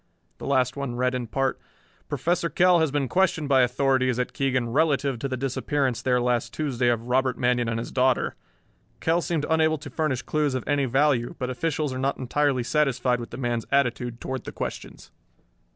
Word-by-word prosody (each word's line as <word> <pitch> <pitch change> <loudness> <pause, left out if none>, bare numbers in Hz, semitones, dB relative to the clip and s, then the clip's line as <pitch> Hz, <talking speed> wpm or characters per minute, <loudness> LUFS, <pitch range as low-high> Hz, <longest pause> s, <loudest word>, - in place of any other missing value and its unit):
The - - -6
last 130 -2 +2
one 140 -4 -4
read 125 +1 +1
in 125 -2 -3
part: 135 +4 -1 0.5
Professor 170 0 0
Kell 180 0 +4
has 160 -1 +2
been 140 -1 -1
questioned 165 -2 +1
by 135 -2 +5
authorities 130 0 +2
at 125 - -2
Keegan 130 -3 0
relative 140 -2 +1
to 140 - -2
the 130 -1 -3
disappearance 135 0 -1
there 125 -1 +2
last 120 0 0
Tuesday 130 -5 0
of 120 -1 +1
Robert 130 +1 +1
Manion 125 -1 +1
and 115 - -1
his 115 - -5
daughter. 130 0 +2 0.7
Kell 165 +2 +1
seemed 165 -3 -1
unable 160 0 +2
to 145 -1 -10
furnish 135 -3 -1
clues 150 -3 0
of 130 - -2
any 145 -1 +2
value, 130 -1 +1
but 130 -1 -3
officials 150 +1 -1
are 130 - -4
not 135 +1 0
entirely 135 0 0
satisfied 130 -3 +1
with 120 - -7
the 120 - -8
man's 120 -3 -2
attitude 125 -3 0
toward 130 0 -5
the - - -5
questions. - - -7
130 Hz, 190 wpm, -25 LUFS, 125-145 Hz, 0.7 s, by